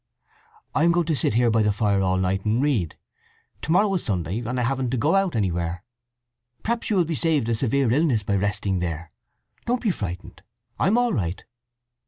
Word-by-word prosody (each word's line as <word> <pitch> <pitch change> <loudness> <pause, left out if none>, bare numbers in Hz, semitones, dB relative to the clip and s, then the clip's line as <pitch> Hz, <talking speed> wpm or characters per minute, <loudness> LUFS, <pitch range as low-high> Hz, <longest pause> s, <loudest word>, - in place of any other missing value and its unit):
"I 155 - +2
am 170 0 +4
going 175 -1 +1
to 160 -1 0
sit 115 -4 0
here 120 -1 +3
by 110 0 +3
the 105 -1 +3
fire 100 -1 +1
all 95 -1 +1
night, 95 +1 0
and 110 +2 +1
read. 130 - 0 0.6
To 160 - -3
morrow 195 +3 +3
is 180 - -1
Sunday, 90 0 -2
and 125 +2 -3
I - - +1
haven't 130 0 -1
to 130 - -1
go 145 +7 +2
out 195 -5 +2
anywhere. 85 -4 -1 0.8
Perhaps 235 +1 -1
you 215 - +1
will 180 -3 +3
be 165 - -3
saved 155 -6 +1
a - - +2
severe 130 +1 +1
illness 130 -6 +2
by 100 0 0
resting 100 -1 -1
there. 85 -2 -4 0.6
Don't 245 +1 0
be 215 - +2
frightened. 90 - -6 0.4
I'm 210 +5 +3
all 245 -1 +2
right. 90 -3 -3
115 Hz, 205 wpm, -24 LUFS, 95-160 Hz, 0.8 s, am